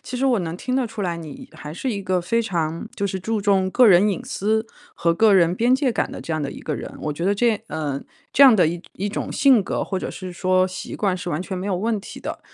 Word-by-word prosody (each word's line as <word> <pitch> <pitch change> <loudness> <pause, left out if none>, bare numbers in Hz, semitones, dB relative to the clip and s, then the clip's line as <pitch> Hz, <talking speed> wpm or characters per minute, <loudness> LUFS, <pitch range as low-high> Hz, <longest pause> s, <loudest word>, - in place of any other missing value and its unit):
其 250 - -6
实 265 +2 +1
我 250 -4 +3
能 165 -2 -4
听 255 +5 -3
得 260 -3 +1
出 225 -1 -8
来， 175 -3 -1
你 160 -4 -9
还 150 - -9
是 255 +10 -3
一 200 -3 -3
个 185 -1 0
非 210 +7 0
常 165 -5 -2
就 200 - -1
是 190 0 -3
注 220 +3 -2
重 195 -2 +2
个 250 +4 +5
人 195 +1 +6
隐 195 - -2
私 220 +3 -1 0.3
和 170 0 +1
个 220 +4 +5
人 175 -2 +4
边 240 +6 +3
界 265 -1 +1
感 - - -1
的 - - -7
这 165 - -5
样 155 -1 -1
的 140 - -3
一 - - -9
个 150 - -3
人。 - - -7
我 150 - -2
觉 170 +4 -4
得 200 - +2
这 225 0 +2
嗯， 145 -3 -3 0.3
这 280 - +5
样 260 -4 +8
的 185 -6 +4
一 175 +4 -4
种 200 - -4
性 265 -7 +5
格， - - -2
或 190 - -3
者 - - -4
是 185 -1 -7
说 185 +1 +2
习 185 - -7
惯 195 -3 0
是 180 -1 -5
完 150 - -2
全 185 0 -5
没 185 - -4
有 195 - 0
问 220 +3 0
题 - - -10
的。 - - -6
190 Hz, 295 characters per minute, -22 LUFS, 170-220 Hz, 0.3 s, 样